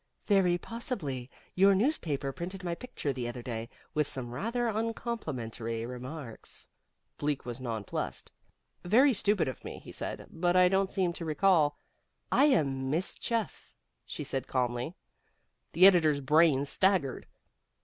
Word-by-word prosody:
"Very 190 -4 +4
possibly. 175 - -4 0.2
Your 195 +1 +5
newspaper 170 - 0
printed 180 +6 -6
my 175 -1 -1
picture 170 - -4
the 125 -2 -3
other 120 0 -6
day, 115 -1 -4 0.2
with 150 -2 +2
some 120 -2 -4
rather 235 - -1
uncomplimentary 155 - -3
remarks." 125 0 -5 0.5
Bleak 145 -1 -1
was 120 +1 -6
nonplussed. 115 -5 -4 0.5
"Very 250 +9 +5
stupid 200 - +2
of 130 - -5
me," - - -7
he - - -11
said, - - -5
"but 175 +2 +1
I 180 0 +6
don't 195 0 +2
seem 185 -4 0
to 170 - -6
recall 155 -2 +3 0.3
" - - -47
"I - - +8
am 135 - +2
Miss 165 +6 0
Chuff," 230 -2 -3 0.3
she - - -6
said 135 -1 -3
calmly. 125 +5 -1 0.8
The 185 - +6
editor's 160 -7 +6
brain 145 0 +4
staggered. 185 -4 +1
160 Hz, 140 wpm, -30 LUFS, 130-195 Hz, 0.8 s, I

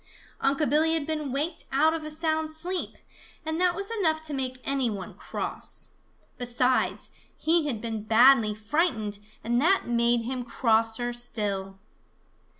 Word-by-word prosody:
Unc' 280 +2 +1
Billy 315 +4 +3
had 315 -3 -1
been 305 -3 -3
waked 295 +6 -2
out 305 +4 +4
of 325 -1 -4
a 305 - -5
sound 315 0 -1
sleep, 350 +4 -3 0.5
and 315 +2 -2
that 360 -1 +3
was 400 +2 -3
enough 335 -8 +1
to 315 -1 -4
make 260 -2 -2
any 270 -3 +1
one 200 -4 -6
cross. - - -5 0.5
Besides, 250 +1 +1 0.3
he 320 -1 +2
had 230 -7 -2
been 225 -2 -4
badly 225 -1 +5
frightened, 220 - 0 0.2
and 240 +2 +1
that 380 +6 +3
made 235 0 +2
him 250 +1 -3
crosser 230 0 +1
still. 205 -5 -2
265 Hz, 150 wpm, -27 LUFS, 230-315 Hz, 0.5 s, badly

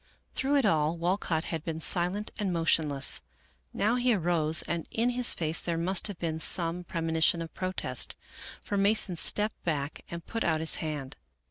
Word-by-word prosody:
Through 275 +2 +1
it 275 -4 +3
all 160 -3 +2
Walcott 170 -2 0
had 165 -3 -4
been 160 -1 -4
silent 180 +5 +1
and 200 -3 0
motionless. 155 -5 +1 0.5
Now 220 +4 +1
he 245 -2 +3
arose, 165 -3 +1
and 170 -1 -3
in 235 +2 0
his 245 0 +1
face 160 -1 +1
there 170 -1 -2
must 180 +4 +1
have 205 -4 -6
been 160 -2 -3
some 170 +1 +2
premonition 165 0 +1
of 165 -1 -6
protest, 185 0 -2 0.5
for 205 - -2
Mason 200 -2 +3
stepped 210 +5 +2
back 145 -3 -2
and 170 0 -7
put 225 -1 -3
out 160 -2 +1
his 160 0 0
hand. 150 -4 -5
170 Hz, 170 wpm, -29 LUFS, 160-200 Hz, 0.5 s, it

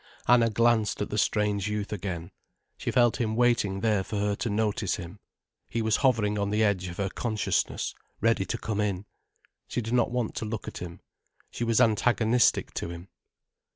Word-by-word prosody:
Anna 120 -1 +5
glanced 115 -1 +2
at - - -7
the 105 - -2
strange 105 -1 +1
youth 105 0 -3
again. 90 -3 -5 0.4
She - - -4
felt 120 -3 +3
him 110 -1 0
waiting 115 -5 +2
there 105 -4 +2
for 105 - -6
her 105 0 +1
to 120 - -2
notice 105 -2 0
him. 90 +1 -9 0.5
He 115 0 -1
was 110 -1 +2
hovering 110 -6 +2
on 100 0 0
the 105 +1 +2
edge 95 -4 +1
of 85 0 -7
her 100 - 0
consciousness, 110 +1 -1 0.3
ready 115 -3 +2
to 90 - -3
come 105 -1 -2
in. 100 -2 -2 0.6
She - - -2
did 115 0 -3
not 125 -1 +3
want 120 -2 -2
to - - -2
look 110 0 -5
at - - -6
him. 85 -1 -8 0.5
She - - -4
was 115 -1 +2
antagonistic 115 +2 +3
to - - -4
him. 85 +2 -9
105 Hz, 190 wpm, -27 LUFS, 100-115 Hz, 0.6 s, Anna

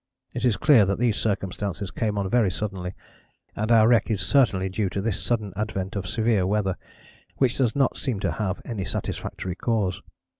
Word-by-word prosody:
It - - -2
is 120 -4 +3
clear 140 -7 +6
that 100 - 0
these 115 -2 +2
circumstances 100 -2 -2
come 105 0 -1
on 100 -1 0
very 115 0 +3
suddenly, 95 -2 -4 0.6
and 110 +2 -1
our 110 -1 +6
wreck 115 -3 +4
is 110 -4 0
certainly 95 -3 +2
due 95 +1 -1
to 95 - -3
this 105 -1 -1
sudden 110 -5 -1
advent 95 -2 -3
of 100 -2 -3
severe 110 -4 +1
weather, 100 -2 0 0.6
which 130 -3 +1
does 120 -4 +2
not 135 -2 +2
seem 125 -8 -2
to - - 0
have 100 -3 -3
any 110 -5 -3
satisfactory 90 +1 -4
cause. 100 -3 -1
105 Hz, 185 wpm, -25 LUFS, 95-115 Hz, 0.6 s, clear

